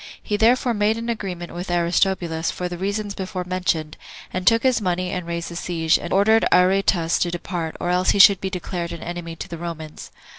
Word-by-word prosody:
He 210 - -1
therefore 240 +3 +3
made 210 +1 +1
an 230 +1 -4
agreement 185 -6 -4
with 175 +2 -6
Aristobulus, 175 -1 0
for 180 - -3
the 175 - -5
reasons 200 +3 -3
before 185 -1 -4
mentioned, 180 -4 -2 0.4
and 185 0 -3
took 230 0 +5
his 255 -3 +2
money, 180 -1 -1
and 180 -3 -4
raised 170 0 -4
the 170 - -8
siege, 165 -2 +1
and 175 - -7
ordered 220 +3 +4
Aretas 180 -2 +3
to 175 - +1
depart, 170 -2 -4
or 175 - -1
else 180 +1 +2
he - - +3
should 195 -1 +7
be 190 - -2
declared 175 -2 -4
an 170 - -7
enemy 170 -1 -6
to - - -7
the 170 - -7
Romans. 160 -2 -7
180 Hz, 210 wpm, -22 LUFS, 170-200 Hz, 0.4 s, should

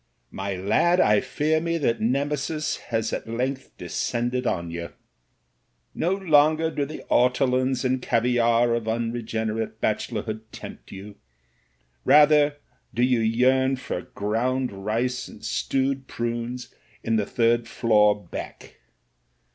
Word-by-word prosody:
''My 95 0 -3
lad, 110 - +2
I 105 - +5
fear 155 +1 0
me 170 0 -1
that 120 -7 0
Nemesis 145 +5 -1
has 115 -2 -1
at - - -4
length 130 +3 -2
descended 120 +1 -2
on 85 -2 -2
you. 85 0 -6 1.0
No 175 +3 0
longer 160 -3 +3
do 145 -2 -1
the 155 +2 -8
ortolans 130 +1 +2
and 130 0 +1
caviare 120 0 +2
of 115 -1 -3
unregenerate 110 -1 -2
bachelorhood 110 0 -2
tempt - - -10
you; 100 +1 -10 0.9
rather 150 -1 +5 0.3
do 120 - 0
you 125 -1 +3
yearn 130 +4 +3
for 125 -8 -5
ground 125 +6 -1
rice 115 +6 -2
and - - -12
stewed 135 0 -1
prunes 120 +1 -4 0.3
in 115 0 +1
the 105 - 0
third 115 0 +1
floor 105 -4 +2
back. - - -8
120 Hz, 125 wpm, -25 LUFS, 110-135 Hz, 1.0 s, I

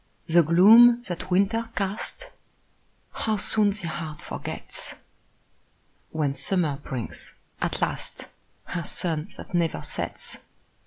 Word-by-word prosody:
The 170 +1 +5
gloom 225 +9 +7
that 185 -2 -6
winter 205 +5 +2
cast, 200 - -3 0.9
How 220 -1 -1
soon 210 0 +2
the 200 -3 -4
heart 155 -2 -5
forgets, - - -7 1.1
When 150 -3 0
summer 155 -2 0
brings, 130 -6 -7 0.3
at - - -1
last, - - -4 0.4
Her 170 -1 -4
sun 165 -3 -2
that - - -11
never 170 -2 0
sets! - - -6
180 Hz, 110 wpm, -26 LUFS, 160-210 Hz, 1.1 s, gloom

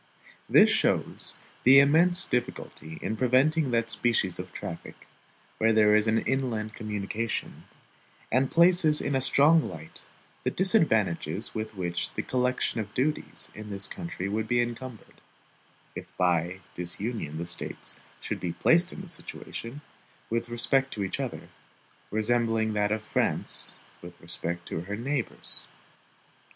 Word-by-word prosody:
This - - +7
shows - - +1 0.3
the 130 +2 +8
immense 170 +6 +4
difficulty 120 -10 -4
in 110 - -2
preventing 130 +5 +2
that 115 -2 0
species 110 -8 0
of - - -6
traffic, - - -7 0.6
where 110 0 +4
there 105 -1 +5
is 105 +1 +3
an 110 +1 +2
inland 115 -5 -2
communication, 105 +1 -4 0.7
and 130 +2 +2
places 170 -3 +4
in 140 - -2
a 135 - +1
strong 150 +5 +5
light 80 -2 -9 0.4
the - - +1
disadvantages 110 - +1
with 110 -1 -5
which 85 -2 -3
the - - -2
collection 125 -2 0
of 105 -1 -4
duties 150 +4 -2
in 105 0 -9
this 100 -1 -1
country 170 - -5
would 110 +2 -2
be 120 +2 +2
encumbered, 120 0 -5 0.7
if - - -7
by 90 +1 +1
disunion 90 -2 -4
the 85 - -4
States 85 -1 -2 0.2
should - - -4
be 85 -2 -3
placed 175 - +3
in 185 - -8
a - - -10
situation, 140 -5 -7 0.5
with 115 +1 -1
respect 135 +3 +2
to 105 - -2
each 95 - -3
other, - - -5 0.6
resembling 110 0 +1
that 105 0 +1
of 110 0 -1
France - - +3 0.3
with 85 0 -12
respect 85 +1 -4
to 80 - -4
her 100 +4 -5
neighbors. 130 +3 -4
115 Hz, 140 wpm, -27 LUFS, 100-135 Hz, 0.7 s, the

